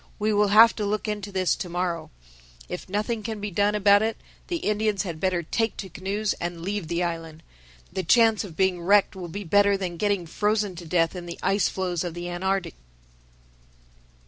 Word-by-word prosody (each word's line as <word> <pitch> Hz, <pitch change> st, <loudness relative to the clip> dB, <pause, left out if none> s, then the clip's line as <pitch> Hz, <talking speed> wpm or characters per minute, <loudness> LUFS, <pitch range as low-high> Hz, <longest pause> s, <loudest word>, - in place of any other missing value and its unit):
We 215 Hz, 0 st, 0 dB
will 205 Hz, 0 st, +3 dB
have 220 Hz, +3 st, +7 dB
to 215 Hz, -, -2 dB
look 210 Hz, +1 st, -1 dB
into 210 Hz, -1 st, -4 dB
this 185 Hz, -2 st, +1 dB
to 180 Hz, -, -5 dB
morrow. 175 Hz, -1 st, -2 dB, 0.6 s
If -, -, -7 dB
nothing 215 Hz, +3 st, -1 dB
can 220 Hz, 0 st, -5 dB
be 205 Hz, 0 st, -4 dB
done 205 Hz, +3 st, +2 dB
about 205 Hz, 0 st, +5 dB
it, 225 Hz, +1 st, -1 dB, 0.3 s
the 350 Hz, -, -2 dB
Indians 210 Hz, -, 0 dB
had 170 Hz, -5 st, -5 dB
better 180 Hz, -1 st, 0 dB
take 225 Hz, +7 st, -1 dB
to 190 Hz, -, -6 dB
canoes 200 Hz, +4 st, -2 dB
and 175 Hz, -1 st, -4 dB
leave 200 Hz, -2 st, -3 dB
the 170 Hz, +2 st, -1 dB
island. 165 Hz, -2 st, -5 dB, 0.5 s
The 190 Hz, -, -1 dB
chance 225 Hz, +6 st, +4 dB
of 175 Hz, -6 st, -10 dB
being 190 Hz, -2 st, +1 dB
wrecked 200 Hz, +3 st, +3 dB
will 180 Hz, -2 st, -6 dB
be 200 Hz, +5 st, -6 dB
better 200 Hz, +2 st, +4 dB
than 180 Hz, -3 st, -4 dB
getting 200 Hz, -2 st, 0 dB
frozen 210 Hz, +2 st, 0 dB
to 170 Hz, -1 st, -8 dB
death 165 Hz, +1 st, +1 dB
in 175 Hz, -1 st, -7 dB
the 170 Hz, -, -6 dB
ice 195 Hz, +2 st, +2 dB
floes 180 Hz, -3 st, -2 dB
of 175 Hz, -2 st, -5 dB
the 175 Hz, 0 st, -5 dB
Antarctic." 190 Hz, +2 st, -1 dB
195 Hz, 200 wpm, -25 LUFS, 175-210 Hz, 0.6 s, have